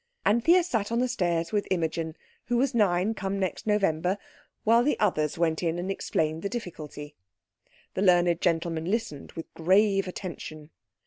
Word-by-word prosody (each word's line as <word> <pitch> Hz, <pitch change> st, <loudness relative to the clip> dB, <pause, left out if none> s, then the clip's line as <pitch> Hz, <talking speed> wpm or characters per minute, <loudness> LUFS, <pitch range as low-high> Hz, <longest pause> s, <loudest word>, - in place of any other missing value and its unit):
Anthea 330 Hz, -, +5 dB
sat 225 Hz, -, -1 dB
on 230 Hz, -, +1 dB
the 250 Hz, +1 st, +2 dB
stairs 170 Hz, -8 st, -1 dB
with 205 Hz, -1 st, 0 dB
Imogen, 165 Hz, -2 st, -1 dB, 0.3 s
who 245 Hz, -1 st, 0 dB
was 265 Hz, +2 st, +1 dB
nine 200 Hz, -2 st, +2 dB
come 195 Hz, -1 st, -3 dB
next 190 Hz, +2 st, -3 dB
November, 190 Hz, -3 st, +1 dB, 0.5 s
while 230 Hz, +2 st, +5 dB
the 295 Hz, -, +1 dB
others 155 Hz, -8 st, +1 dB
went 160 Hz, -1 st, +1 dB
in 170 Hz, -1 st, 0 dB
and 180 Hz, +2 st, -2 dB
explained 160 Hz, -4 st, -1 dB
the 200 Hz, -, -2 dB
difficulty. 155 Hz, -9 st, -7 dB, 0.8 s
The -, -, -2 dB
learned 175 Hz, -3 st, +4 dB
gentleman 165 Hz, -1 st, 0 dB
listened 195 Hz, -7 st, -3 dB
with 165 Hz, -, -8 dB
grave 195 Hz, +3 st, +3 dB
attention. 160 Hz, -4 st, -7 dB
185 Hz, 155 wpm, -27 LUFS, 165-210 Hz, 0.8 s, Anthea